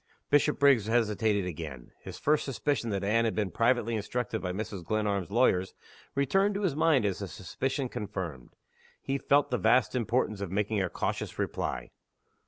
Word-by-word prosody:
Bishopriggs 140 -6 +4
hesitated 110 -3 +1
again. 75 -7 -7
His - - -9
first 150 +1 +2
suspicion 135 -2 -1
that 100 -2 -2
Anne 110 +3 +2
had 115 - 0
been 105 -4 -1
privately 115 +1 +2
instructed 110 +1 -2
by 90 - -2
Mrs. 100 -1 -5
Glenarm's 100 -1 -1
lawyers 100 -5 +2 0.4
returned 195 +9 +2
to 205 - -2
his 170 -8 +1
mind 155 -7 +3
as 100 -1 -1
a 100 - -3
suspicion 130 - -3
confirmed. 90 - -6 0.4
He 135 0 -2
felt 140 +1 +2
the 125 - +1
vast 125 +1 +3
importance 115 -4 0
of 100 - -3
making 105 +1 0
a 95 - -1
cautious - - -3
reply. - - -3
110 Hz, 165 wpm, -29 LUFS, 100-130 Hz, 0.4 s, Bishopriggs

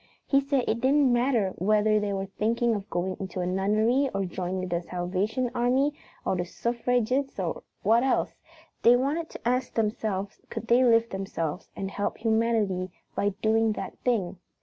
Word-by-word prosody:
He 275 -1 +3
said 275 -2 +1
it 230 - 0
didn't 270 0 +4
matter 240 -5 +2
whether 215 +3 +3
they 205 -1 -2
were 195 0 -2
thinking 230 +4 0
of 205 -1 -4
going 185 +2 -2
into 190 -1 -5
a 180 - 0
nunnery 215 +9 +2
or 195 -1 0
joining 185 +1 -3
the 170 -1 -1
Salvation 185 +8 -2
Army 260 +4 +2 0.3
or - - +1
the 175 - -1
Suffragets 245 +6 -1
or - - -2 0.2
what 230 +2 +4
else, 265 +1 +1 0.5
they 240 - +7
wanted 290 +6 -1
to - - -7
ask 250 +1 0
themselves 210 -3 -2
could - - -5
they 240 +2 +4
lift 230 -1 +4
themselves 185 -3 -4
and 195 0 -4
help 205 - -2
humanity 220 -5 +1 0.2
by 200 -1 0
doing 220 0 +3
that - - -6
thing. 195 -7 0
220 Hz, 170 wpm, -27 LUFS, 195-245 Hz, 0.5 s, they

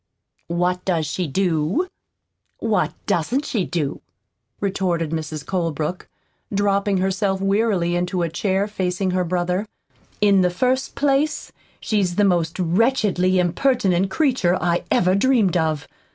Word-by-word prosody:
"What 180 +1 0
does 170 -4 0
she 170 +4 -2
do? 175 - 0 0.7
What 210 -5 0
doesn't 245 - 0
she 205 -7 -1
do?" 155 -6 -3 0.6
retorted 180 -5 -1
Mrs. 155 -2 -4
Colebrook, 165 -2 -2 0.4
dropping 200 0 +1
herself 190 +1 0
wearily 195 -3 +1
into 180 0 -1
a - - +1
chair 195 +4 0
facing 185 -2 -1
her 180 0 +1
brother. 180 +3 -1 0.5
"In 200 -2 +4
the 180 - +3
first 255 +8 0
place, 285 +2 0 0.3
she's 195 -5 0
the 205 - +3
most 170 -4 +1
wretchedly 185 0 +2
impertinent 190 0 +2
creature 245 - +2
I 175 0 0
ever 180 +1 +3
dreamed 210 -3 +3
of. 155 -3 0
185 Hz, 125 wpm, -22 LUFS, 175-205 Hz, 0.7 s, In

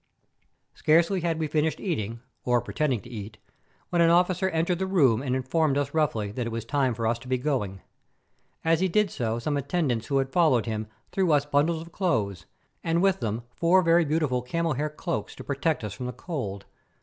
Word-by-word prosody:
Scarcely 170 +4 +3
had 165 -1 0
we 160 - -1
finished 155 0 0
eating, 115 - -3 0.2
or 125 -1 +3
pretending 130 0 -1
to 120 - -13
eat, 105 -1 -7 0.5
when 175 -1 +3
an 165 - +6
officer 180 +2 +3
entered 170 +1 0
the 190 - -1
room 135 - +3
and 130 -2 -1
informed 140 +2 +1
us 145 0 -1
roughly 120 -10 0
that 120 +2 -3
it - - -4
was 115 -1 -4
time 130 -1 +1
for 115 0 -3
us 115 +1 +1
to 130 - -13
be 130 0 +1
going. 120 -9 -2 0.8
As 165 0 +3
he 190 - +2
did 205 +1 +2
so 115 -3 -2
some 145 +5 -1
attendants 140 -5 -1
who 140 - +1
had 135 0 0
followed 155 -10 +4
him 110 -1 -3 0.2
threw 185 -4 +1
us 145 -1 +3
bundles 155 +3 +1
of 170 - -14
clothes, 110 - -1 0.4
and 165 0 +1
with 195 -1 +3
them 110 +1 -2
four 175 +7 +3
very 170 +1 +5
beautiful 150 -5 0
camel 165 +6 -1
hair 150 +3 -1
cloaks 165 +3 -4
to - - -9
protect 145 0 -1
us 105 -2 -4
from 125 +4 -5
the 125 - -4
cold. 105 - -5
145 Hz, 205 wpm, -26 LUFS, 120-165 Hz, 0.8 s, an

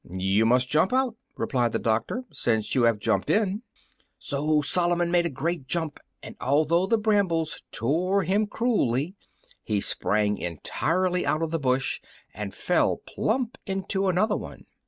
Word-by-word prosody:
"You 95 +4 +1
must 125 +1 +3
jump 155 +7 +2
out," 260 -2 +2 0.2
replied 120 -3 0
the - - +2
doctor, 115 - -1
"since 110 -7 0
you 125 -3 +3
have 115 -2 +3
jumped 110 +2 0
in." 210 -1 +1 0.6
So 150 +1 0
Solomon 175 +2 +1
made 175 -1 +3
a - - -4
great 155 0 -3
jump, 160 -1 -1 0.2
and - - -9
although 155 +7 +2
the 230 - +3
brambles 200 -7 +1
tore 180 +10 +1
him 200 +5 +1
cruelly, 185 - 0 0.5
he 105 -2 -1
sprang 105 +1 +1
entirely 180 - -1
out 155 +2 0
of 160 - -2
the 165 - 0
bush 130 -2 0 0.3
and 105 0 -5
fell - - +1
plump 250 +2 -2
into 195 0 -1
another 205 +4 +2
one. - - -8
160 Hz, 155 wpm, -26 LUFS, 125-190 Hz, 0.6 s, must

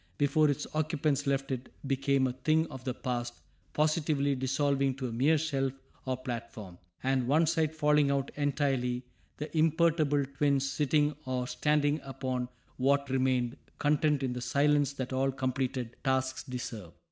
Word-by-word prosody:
Before 145 +1 +3
its 145 +1 -1
occupants 155 -2 0
left 135 0 0
it 130 -1 -4 0.2
became 135 0 +2
a 125 - -1
thing 155 +5 +2
of 130 -1 -9
the 130 - -1
past, 120 -2 -3 0.4
positively 150 -2 +1
dissolving 135 0 +1
to 130 -1 -3
a - - -5
mere 140 +8 +3
shelf 135 -4 -1 0.3
or 130 -1 0
platform, 115 -7 -7 0.2
and 130 -2 +1
one 155 +5 +4
side 160 -1 +1
falling 150 -2 +3
out 140 -1 0
entirely, 135 -4 0 0.3
the 150 +2 -6
imperturbable 155 -2 +3
twins 140 -1 +2
sitting 150 +1 +1
or 125 -1 -1
standing 150 +2 +1
upon 130 -2 -3 0.3
what 140 +1 +2
remained, 130 -1 +1 0.2
content 150 -1 +2
in 130 -2 -1
the 125 - -5
silence 145 +2 +2
that 130 -1 -4
all 135 +1 +1
completed 130 -2 -2
tasks 130 -1 0
deserve. 125 - -6
135 Hz, 150 wpm, -30 LUFS, 130-150 Hz, 0.4 s, one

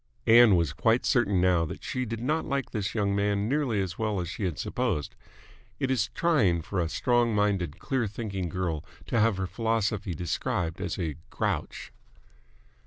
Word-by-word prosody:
Ann 115 -3 +7
was 85 -5 +1
quite 115 - +2
certain 105 -7 +2
now 90 -2 +3
that - - -8
she 130 0 -2
did 115 -1 -5
not 155 +6 0
like 135 -2 -2
this 105 -2 -3
young 100 -2 +1
man 100 0 +1
nearly 135 -5 0
as 95 0 -4
well 110 -3 0
as 90 - -3
she 100 - -3
had 85 -5 -2
supposed. 75 -2 -2 0.7
It 130 - 0
is 125 -3 +1
trying 110 - +2
for 95 +3 -3
a 85 -2 0
strong 120 +4 +2
minded, 100 -6 0
clear 130 +1 -1
thinking 100 -4 -4
girl 85 -3 -2 0.2
to 115 - 0
have 110 -2 +3
her 95 - -1
philosophy 105 -1 -1
described 85 +1 -2
as 90 - -3
a 80 -6 -3
grouch. - - -3
100 Hz, 175 wpm, -28 LUFS, 90-115 Hz, 0.7 s, Ann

